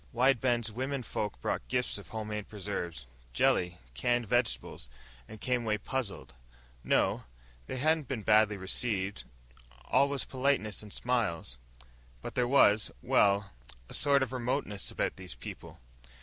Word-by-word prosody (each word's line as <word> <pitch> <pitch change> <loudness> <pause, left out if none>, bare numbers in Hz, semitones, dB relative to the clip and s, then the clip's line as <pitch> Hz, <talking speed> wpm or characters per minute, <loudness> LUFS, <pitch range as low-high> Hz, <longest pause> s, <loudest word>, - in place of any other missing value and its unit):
Wide 125 +1 +4
Bend's 120 -3 +1
womenfolk 125 - -3
brought - - -2
gifts 125 -4 0
of 100 - -12
home 110 -1 -4
made 105 -1 -4
preserves, 90 - -4 0.3
jelly, 90 +7 +2 0.2
canned 120 - +1
vegetables... 120 - -1 0.4
and 110 - -9
came 125 +1 0
away 110 -2 0
puzzled. 105 - -4 0.5
No, - - +2 0.4
they - - -4
hadn't 155 +1 +2
been 120 -5 -3
badly 105 -1 +4
received. 95 - -2 0.6
All 140 +1 +4
was 140 -1 -2
politeness 130 -6 0
and 105 -1 -11
smiles. 100 - -1 0.6
But - - -5
there 125 -1 +1
was 110 -5 +5
well, 100 -1 +3 0.4
a - - -10
sort 140 -2 +4
of 130 - -4
remoteness 125 -5 -1
about - - -2
these 95 -5 -6
people. - - -9
110 Hz, 140 wpm, -31 LUFS, 100-125 Hz, 0.6 s, was